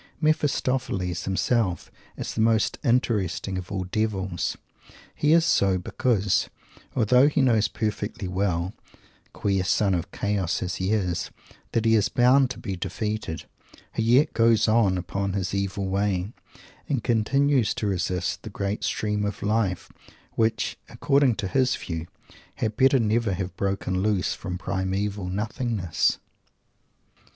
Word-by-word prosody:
Mephistopheles 130 - 0
himself 95 -1 0 0.3
is - - -4
the 110 - -1
most 110 -1 +2
interesting 110 - 0
of 90 +3 -9
all 95 -2 -2
Devils. 95 -2 -2 0.3
And - - -21 0.2
he 150 - +1
is 165 0 +5
so 95 -9 +3
because, 100 +1 0 0.5
although 125 +3 +5
he 150 - +1
knows 115 -4 +3
perfectly 105 -2 -3
well 90 -1 -1 0.6
queer 95 -2 0
Son 95 +1 +2
of 90 +2 -2
Chaos 100 -4 -1
as 90 -1 -3
he 95 +2 -1
is 90 -5 0 0.4
that 115 -1 +1
he 115 - +4
is 105 -2 +3
bound 130 +2 +4
to 130 - -6
be 95 - -4
defeated, 105 -1 -4 0.5
he - - -1
yet 125 +7 +4
goes 115 -1 +4
on 110 -4 +3
upon 95 +2 -3
his 95 -2 -2
evil 100 0 -2
way, 100 +1 -1 0.6
and 135 -6 0
continues 130 +2 +2
to - - -3
resist 90 -2 -1
the - - -8
great 100 +1 -3
stream 105 -1 -1
of 105 0 -3
Life 105 -4 0 0.4
which, 110 0 0
according 135 -4 +2
to 100 - -3
his 130 +5 +2
view, 80 -1 -5 0.5
had 110 -1 -2
better 135 +1 +5
never 115 -2 +1
have 95 0 -4
broken 95 -1 -1
loose 100 -2 +1
from 90 -1 -5
primeval 95 +1 -2
Nothingness. 105 -2 0
105 Hz, 140 wpm, -25 LUFS, 95-115 Hz, 0.6 s, is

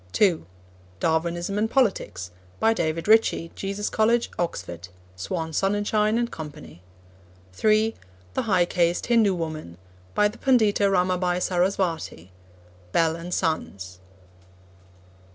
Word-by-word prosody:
(2) 185 -6 +2 0.5
Darwinism 170 +4 0
and 220 +1 +1
Politics. 190 - 0 0.3
By 225 0 +4
David 165 -4 -2
Ritchie, 215 -6 +3
Jesus 200 +1 -3
College, 230 +2 +2
Oxford. 85 - -4 0.3
(Swan 130 - -4
Sonnenschein 205 +4 +1
and 235 0 -1
Co.) 155 -2 -6 1.0
(3) 215 - +2 0.4
The - - 0
High 185 -5 +2
Caste 175 0 +1
Hindu 225 -5 +3
Woman. 155 - -5 0.4
By 210 - +4
the 210 +3 -9
Pandita 215 -6 +3
Ramabai 180 -1 +1
Sarasvati. 175 - -1 0.6
(Bell 165 - +2
and 170 +2 -7
Sons.) 100 - -2
180 Hz, 110 wpm, -25 LUFS, 160-210 Hz, 1.0 s, By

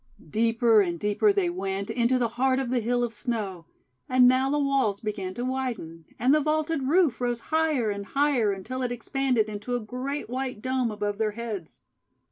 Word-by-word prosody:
Deeper 230 0 +4
and 175 -3 -2
deeper 210 - +3
they 395 -3 +1
went 200 - -3
into 240 +2 +2
the 240 -2 +1
heart 255 +3 +1
of 265 -2 -2
the 255 - +2
Hill 245 +2 0
of 235 -1 -2
Snow. 210 -7 -4 0.4
And 255 -1 +6
now 260 +1 +3
the 295 - +1
walls 275 -8 +1
began 195 -4 -4
to 245 - -3
widen; 240 -12 -4
and 255 +4 +3
the 305 - +4
vaulted 310 -2 0
roof 310 -6 +3
rose 240 -1 0
higher 305 -9 +2
and 200 0 -4
higher, 275 -7 +2
until 200 +7 -5
it 250 -1 -1
expanded 245 -1 0
into 215 +3 -4
a - - 0
great 255 +6 -4
white 255 -1 -3
dome 255 0 0
above 205 -1 -3
their 215 -1 0
heads. 215 -8 -6
245 Hz, 190 wpm, -26 LUFS, 210-265 Hz, 0.4 s, And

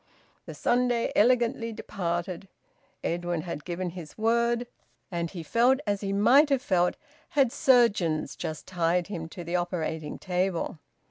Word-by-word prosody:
The - - -7
Sunday 245 -1 +1
elegantly 235 0 +3
departed. 175 -2 -4 0.6
Edwin 175 -1 -1
had 155 -3 -6
given 180 0 -3
his 165 -3 -10
word, 235 +2 +2 0.5
and 170 -1 -2
he 170 -2 -7
felt 240 - +3
as 205 -2 -1
he 195 -1 -2
might 240 +10 +5
have 270 -2 +1
felt 180 -4 +2 0.3
had 275 -5 +3
surgeons 215 - +3
just 155 -1 -5
tied 175 0 +1
him 165 -5 -5
to 175 0 -8
the 170 +2 -3
operating 160 -3 -3
table. 180 -3 -1
185 Hz, 140 wpm, -27 LUFS, 170-235 Hz, 0.6 s, might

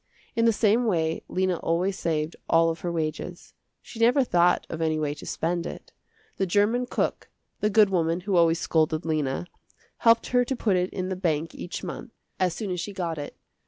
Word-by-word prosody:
In 230 - +2
the 230 - +6
same 225 +2 +2
way 165 -5 0
Lena 185 -1 0
always 180 +5 0
saved 160 -2 -2
all 165 0 +4
of 165 - -6
her 175 - -3
wages. 165 +2 -4 0.3
She 230 - -11
never 245 +4 +5
thought 175 -6 +3
of 165 -1 -5
any 160 -1 +1
way 150 -2 -1
to 150 - -11
spend 170 +1 -1
it. - - -9 0.5
The 195 - 0
german 215 +7 +2
cook, - - -2 0.3
the 210 - +1
good 210 -1 +5
woman 170 -1 +1
who 195 +1 -1
always 170 -1 +4
scolded 160 0 +1
Lena, 155 -1 -1 0.5
helped 230 0 +4
her 245 0 +3
to 265 +2 -2
put 210 -5 +1
it 180 0 +1
in 185 -1 -4
the 190 - -2
bank 165 -3 -1
each 175 - -6
month, 235 - -7 0.3
as 180 -2 +1
soon 210 -4 -4
as 180 - -2
she 200 +4 -4
got 170 -5 -3
it. 145 - -7
175 Hz, 200 wpm, -26 LUFS, 165-205 Hz, 0.5 s, the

